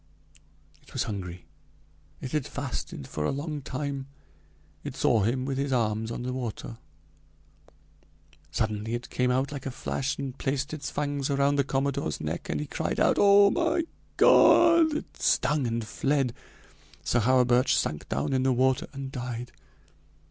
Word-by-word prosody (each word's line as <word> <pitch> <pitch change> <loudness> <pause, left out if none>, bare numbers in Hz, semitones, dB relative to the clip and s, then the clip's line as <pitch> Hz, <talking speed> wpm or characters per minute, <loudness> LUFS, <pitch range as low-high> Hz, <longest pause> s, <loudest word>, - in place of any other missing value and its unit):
It - - -19
was - - 0
hungry, 90 -5 -6 0.8
it 130 - -5
had 150 -4 -1
fasted 130 - -5
for 75 - -4
a - - +1
long 145 +1 -4
time; 135 +1 -4 0.8
it - - -6
saw 115 - +3
him 125 +5 0
with 135 -1 -2
his 140 0 -1
arms 110 -3 0
on 115 - -4
the 125 0 -3
water. 120 -2 -5 1.7
Suddenly 110 +1 -2
it 120 - -7
came 125 0 +1
out 130 +3 +1
like 140 -2 -6
a - - -1
flash 135 +2 -3
and 135 -2 -5
placed 140 +1 -2
its 150 -2 -4
fangs 145 -1 -2
around 140 0 +2
the 140 - +3
commodore's 135 - -1
neck, - - -4
and 75 - -1
he 75 - -3
cried - - -3
out: - - +3
'Oh! 200 0 +7
oh! - - -1
my 335 0 +1 0.3
God!' 330 -2 +6
It - - -10
stung 150 -4 +2
and 115 -1 -2
fled. 135 +3 0 0.7
Sir 120 - +1
Hawerburch 125 +1 +4
sank 75 -1 -2
down - - -1
in 130 - +2
the 130 0 +2
water 130 +1 +2
and 135 -1 -6
died. 125 -2 -5
130 Hz, 160 wpm, -27 LUFS, 120-140 Hz, 1.7 s, Oh